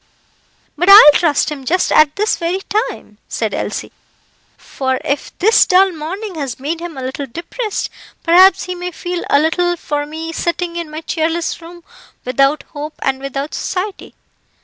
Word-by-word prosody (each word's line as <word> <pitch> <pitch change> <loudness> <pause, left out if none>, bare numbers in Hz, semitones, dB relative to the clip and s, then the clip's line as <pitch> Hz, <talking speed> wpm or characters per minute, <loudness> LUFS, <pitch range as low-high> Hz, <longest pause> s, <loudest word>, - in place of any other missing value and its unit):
"But 355 +5 +1
I - - +11
will 295 -8 +9
trust 310 -2 +1
him 285 -3 -6
just 360 +8 0
at 310 -1 +4
this 425 +2 +1
very 350 +3 -2 0.3
time," 210 - -12
said - - -2
Elsie; - - -4 0.7
"for 260 -1 -3
if 280 +1 -2
this 440 +5 +4
dull 380 +1 +4
morning 365 +6 -6
has 275 -7 -5
made 310 +5 -3
him 340 -4 -7
a 260 - -5
little 265 +2 -5
depressed, 385 - -4 0.3
perhaps 360 +2 +6
he 365 - -4
may 360 0 -5
feel 355 0 -5
a - - +5
little 350 +3 +1
for 290 -2 -3
me 320 +2 -6
sitting 345 +1 -2
in 340 -2 -4
my 310 +1 -7
cheerless 330 +1 -2
room, 345 +1 -12 0.4
without 275 +3 +1
hope 300 +1 -6
and 265 -1 0
without 275 +2 -5
society. 390 +2 -4
330 Hz, 170 wpm, -17 LUFS, 290-355 Hz, 0.7 s, I